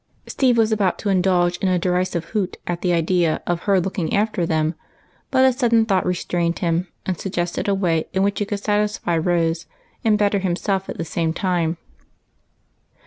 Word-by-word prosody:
Steve 255 -3 +2
was 225 -1 +3
about 205 -4 +1
to 205 - -3
indulge 180 -2 +2
in 195 - 0
a 185 -1 +2
derisive 180 -1 0
hoot 200 -4 -1
at 175 -1 -3
the 180 - +1
idea 170 -1 +1
of 175 -1 -1
her 195 -1 +5
looking 180 -2 -2
after 205 -4 0
them, 155 0 +1 0.6
but 260 -1 +4
a 260 - +4
sudden 235 -3 +3
thought 195 -4 +1
restrained 175 -1 -1
him, 170 +1 0 0.2
and 185 -3 -2
suggested 175 -2 -2
a 200 - +2
way 170 -4 +1
in 190 +1 +1
which 200 0 0
he 205 - 0
could 205 0 -3
satisfy 210 -4 0
Rose, 165 -1 0 0.4
and 215 -2 +3
better 205 -1 +2
himself 190 +1 -1
at - - -5
the 165 - -3
same 165 -1 -1
time. 175 -3 0
185 Hz, 185 wpm, -21 LUFS, 170-205 Hz, 0.6 s, her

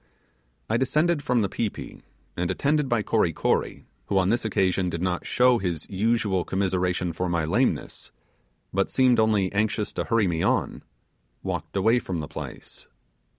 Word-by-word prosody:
I 115 - +1
descended 155 +5 +1
from 125 -5 +1
the - - +1
pi 110 +3 -1
pi, - - -10 0.3
and 85 0 -1
attended 140 +8 +1
by 115 -3 +1
Kory 105 -8 +1
Kory, - - -1 0.2
who 100 - 0
on 95 0 +3
this 120 +3 +1
occasion 95 -4 +1
did 85 0 -4
not 90 -1 -2
show 125 -1 +4
his 85 -5 -3
usual 100 -2 +1
commiseration 90 -2 -1
for 90 +2 -2
my 85 -2 0
lameness, 80 - -1 0.6
but 95 +1 +1
seemed 130 -3 +3
only 105 -4 +2
anxious 105 0 0
to - - -2
hurry 115 -2 +2
me 80 -2 -1
on, - - 0 0.6
walked - - -4
away 115 +5 +3
from 90 -7 -4
the 75 - -5
place. - - -9
100 Hz, 165 wpm, -25 LUFS, 90-115 Hz, 0.6 s, show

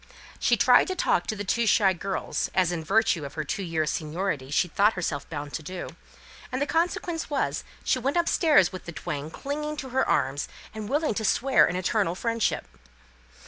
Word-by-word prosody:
She - - +3
tried - - +5
to 375 - -2
talk 175 - +1
to 220 - -1
the 205 - -4
two 230 +4 +1
shy 200 -3 +4
girls, 190 +2 -2
as 180 -2 +3
in 165 -2 -3
virtue 215 -2 +2
of 140 +1 -7
her 155 - -2
two 195 +7 -3
years' 160 -4 -1
seniority 155 -3 -3
she 150 +5 +2
thought 205 +6 +3
herself 170 -6 -3
bound 145 -2 -6
to - - -3
do; 180 +3 -6 0.6
and 255 - -2
the 285 - +1
consequence 340 +1 -1
was, 290 - -1 0.2
she 255 - +1
went 275 +6 0
upstairs 320 - +4
with 185 - -8
the 170 - -7
twain 150 -2 -5
clinging 300 - -4
to 265 -2 -5
her 265 +1 +1
arms, 140 +2 +1 0.3
and 215 -1 -6
willing 295 -1 +1
to 220 - -3
swear 260 +4 +4
an 180 - -2
eternal 185 -1 0
friendship. 230 +2 -1
200 Hz, 195 wpm, -26 LUFS, 165-265 Hz, 0.6 s, tried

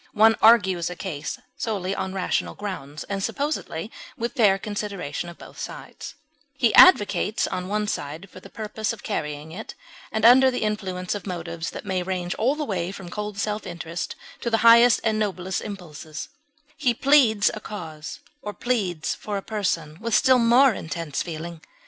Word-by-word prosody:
One 220 +1 +6
argues 190 -7 +5
a 180 - -6
case 150 -6 -5 0.2
solely 195 -4 -2
on 190 - -3
rational 190 - -1
grounds 150 -8 -6
and 195 0 -4
supposably 275 - -3 0.3
with 235 +1 -3
fair 205 -5 +4
consideration 200 -6 -4
of 170 - -11
both - - -13
sides; - - -8 0.4
he 240 -6 +3
advocates 215 - +6
one 205 +4 -2
side 155 +2 -4
for 185 - -13
the - - -14
purpose 220 +1 -3
of 230 - -11
carrying 150 -6 -4
it, 215 +7 -8 0.4
and 220 0 0
under 260 +3 +8
the 250 -3 -2
influence 190 -4 -2
of 205 -1 -6
motives 170 -2 -4
that - - -8
may 190 -2 -1
range 180 -1 -2
all 255 +6 +1
the 300 0 -3
way 185 -5 -2
from 190 -3 -9
cold 210 0 -5
self 210 +1 -2
interest 170 0 -5 0.2
to 235 - -2
the 225 - +2
highest 235 +1 +7
and 220 -1 +1
noblest 190 -3 -2
impulses; 160 -6 -8 0.5
he 255 -6 +1
pleads 245 -7 +4
a 215 - -5
cause, 160 -8 -8 0.2
or 210 - -5
pleads 195 -10 -1
for 205 -1 -4
a 195 - -5
person 170 -7 -2
with 230 -1 0
still 260 -1 +5
more 240 +2 +5
intense 165 -4 -4
feeling. 165 0 -6
200 Hz, 170 wpm, -24 LUFS, 175-220 Hz, 0.5 s, under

